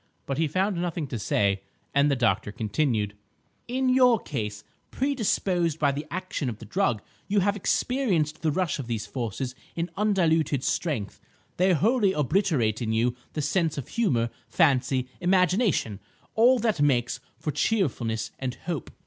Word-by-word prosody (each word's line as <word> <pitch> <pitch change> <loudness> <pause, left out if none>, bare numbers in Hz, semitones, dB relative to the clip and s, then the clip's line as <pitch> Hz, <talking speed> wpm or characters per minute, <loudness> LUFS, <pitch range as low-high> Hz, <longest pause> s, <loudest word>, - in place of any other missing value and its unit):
But 135 +1 -2
he 160 - +2
found 185 +3 0
nothing 170 -3 -2
to 120 - -3
say, 100 -1 +1 0.3
and 140 +1 +4
the 140 - +2
doctor 110 -5 +1
continued— 110 -1 0 0.5
"In 260 +2 0
your 255 -2 +5
case, 105 - -4 0.3
predisposed 195 - 0
by 145 -3 +2
the 145 +2 -5
action 185 -6 -3
of 110 - -5
the 115 - -11
drug, 120 - 0 0.2
you 200 0 +2
have 200 +2 +2
experienced 195 - 0
the 160 - +1
rush 170 -2 -1
of 130 - -5
these 115 -3 -2
forces 125 +1 -4 0.2
in 170 +1 -2
undiluted 165 - +2
strength. 135 - -2 0.4
They 185 +1 +4
wholly 205 - +3
obliterate 145 - +1
in 110 -2 -1
you 120 +2 +1 0.2
the 150 - -2
sense 160 +1 +1
of 140 - -5
humour, 125 - +1 0.2
fancy, 130 -1 +2
imagination,—all 185 - +2
that 220 -9 0
makes 125 -4 +2 0.2
for 150 - -3
cheerfulness 120 - 0
and 130 -1 -3
hope. 170 -7 -3
150 Hz, 150 wpm, -26 LUFS, 120-190 Hz, 0.5 s, your